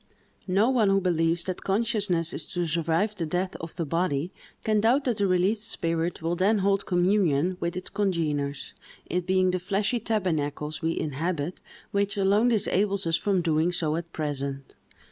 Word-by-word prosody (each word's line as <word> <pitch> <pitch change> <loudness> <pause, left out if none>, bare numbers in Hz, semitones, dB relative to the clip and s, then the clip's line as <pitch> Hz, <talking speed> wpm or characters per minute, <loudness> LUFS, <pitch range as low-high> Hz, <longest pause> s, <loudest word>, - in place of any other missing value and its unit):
No 200 +7 +3
one 225 -6 +3
who 195 0 +4
believes 170 -2 +1
that 185 0 -4
consciousness 200 -5 +1
is - - -2
to 175 -1 -1
survive 165 +5 0
the 170 -6 -3
death 180 +3 -2
of 165 0 -8
the 170 - -2
body, 165 0 -1 0.3
can 215 -1 +2
doubt 245 +6 +3
that 245 -5 0
the 200 -2 +2
released 195 +4 +1
spirit 165 -4 -2
will 165 +1 0
then 195 +5 +3
hold 200 0 +1
communion 180 -3 +2
with 170 0 -2
its 185 - -5
congeners; 150 -8 -1 0.3
it 180 +1 -2
being 185 0 +3
the 185 - -1
fleshly 200 +5 0
tabernacles 155 -8 -2
we 165 0 -1
inhabit 155 +2 -3 0.3
which 200 0 0
alone 200 +4 +3
disables 200 -3 +1
us 165 -1 +2
from 190 0 0
doing 160 +1 +2
so 160 -3 0
at 170 0 -5
present. 140 -3 -3
180 Hz, 170 wpm, -26 LUFS, 165-200 Hz, 0.3 s, who